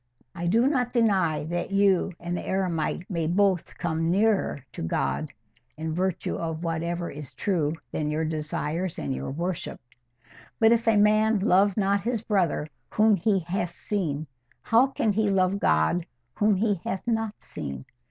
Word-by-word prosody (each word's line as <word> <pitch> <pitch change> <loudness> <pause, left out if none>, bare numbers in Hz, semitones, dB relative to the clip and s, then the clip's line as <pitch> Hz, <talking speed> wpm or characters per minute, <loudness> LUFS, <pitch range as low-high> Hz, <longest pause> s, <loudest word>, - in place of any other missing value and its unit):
I 175 -1 -3
do 230 +7 +3
not 250 -4 0
deny 195 -11 +2
that 175 +3 -3
you 195 -1 +3
and 175 +1 -3
the - - -3
eremite 180 -2 -1
may 165 -4 -1
both 190 0 +1
come 165 -1 -1
NEARER 195 - +1
to - - -7
God, 80 - -1 0.5
in 160 0 -3
virtue 185 +1 -1
of 165 0 -4
whatever 170 +1 -2
is 145 -2 -9
true 160 -7 0 0.2
in 150 -1 -1
your 155 +1 -1
desires 155 +2 -3
and 70 -2 -2
your 65 +1 -4
worship; 170 +5 -4 0.8
'but 225 0 +6
if 235 0 +2
a 225 -2 +5
man 215 +1 +4
love 200 0 +3
not 200 0 +2
his 235 0 -1
brother 185 -8 +1 0.2
whom 215 0 +4
he 195 +1 +1
hath 175 +1 -2
seen, 165 -6 -3 0.4
how 235 +4 +4
can 225 -5 0
he 210 0 +1
love 195 0 +2
God 80 - +2 0.3
whom 210 -1 +3
he 205 -2 0
hath 190 - -3
not 225 -2 -1
seen? 70 -1 -7
185 Hz, 160 wpm, -26 LUFS, 160-210 Hz, 0.8 s, but